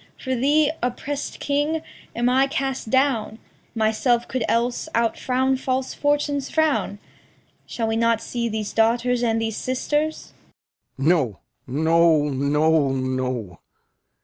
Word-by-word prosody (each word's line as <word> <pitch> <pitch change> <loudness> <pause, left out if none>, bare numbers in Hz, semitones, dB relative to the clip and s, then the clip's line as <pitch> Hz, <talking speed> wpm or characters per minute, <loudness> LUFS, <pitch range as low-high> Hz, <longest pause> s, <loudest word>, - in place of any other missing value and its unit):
For 260 -1 -2
thee, 290 +4 +3
oppressed 275 +4 -3
king, 295 +3 0 0.3
am 240 +1 +1
I 260 +2 +3
cast 270 -3 -3
down; 260 -4 +1 0.4
Myself 230 +2 +1
could 255 -3 -2
else 240 +6 0
outfrown 255 +3 +1
false 260 0 -2
Fortune's 290 -1 0
frown. 315 -9 +1 0.7
Shall 230 - -3
we 225 0 0
not 230 0 +2
see 235 0 -3
these 215 -1 -4
daughters 235 +2 +2
and 225 -2 +1
these 225 -1 -2
sisters? 295 +4 -2 0.6
Lear. 135 +2 -1
No, 135 - +2 0.3
no, 160 +1 +3
no, 145 +2 +2
no! 130 -7 -3
235 Hz, 120 wpm, -23 LUFS, 170-265 Hz, 0.7 s, thee